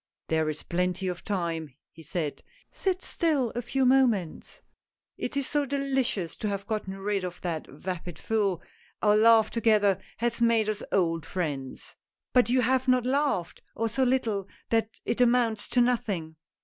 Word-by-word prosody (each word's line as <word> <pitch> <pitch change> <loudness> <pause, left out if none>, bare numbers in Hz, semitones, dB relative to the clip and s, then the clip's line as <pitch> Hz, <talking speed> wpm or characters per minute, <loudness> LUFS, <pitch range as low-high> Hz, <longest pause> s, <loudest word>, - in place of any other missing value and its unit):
" - - -64
There 160 -1 +1
is 155 0 -5
plenty 180 +2 -1
of 180 -1 -4
time! 165 - -3
" - - -66
he 165 - -14
said, 155 -1 -3 0.2
" - - -33
sit 375 -1 0
still 290 -9 +1
a 240 - -3
few 265 +3 0
moments. 245 -10 +1 0.5
It - - -4
is 280 - 0
so 290 0 0
delicious 265 -10 -1
to 215 - -2
have 200 0 -3
gotten 205 -3 -3
rid 200 0 -1
of 180 -1 -5
that 165 -3 -3
vapid 175 +3 -6
fool 205 -6 0 0.2
— - - -33
our 210 -1 +5
laugh 225 0 +5
together 215 -4 +3 0.2
has 235 0 -1
made 230 -2 +3
us 215 -1 -2
old 165 -4 +1
friends! 140 -3 -4 0.2
" - - -63
"But 250 -2 +4
you 255 +1 +3
have 260 +2 +1
not 255 -1 +3
laughed, 265 - 0
or 230 - 0
so 230 +4 -2
little 230 -6 +1 0.2
that 225 -1 0
it 235 - 0
amounts 235 -3 +2
to 245 - +2
nothing." 200 -10 0
215 Hz, 180 wpm, -28 LUFS, 180-250 Hz, 0.5 s, our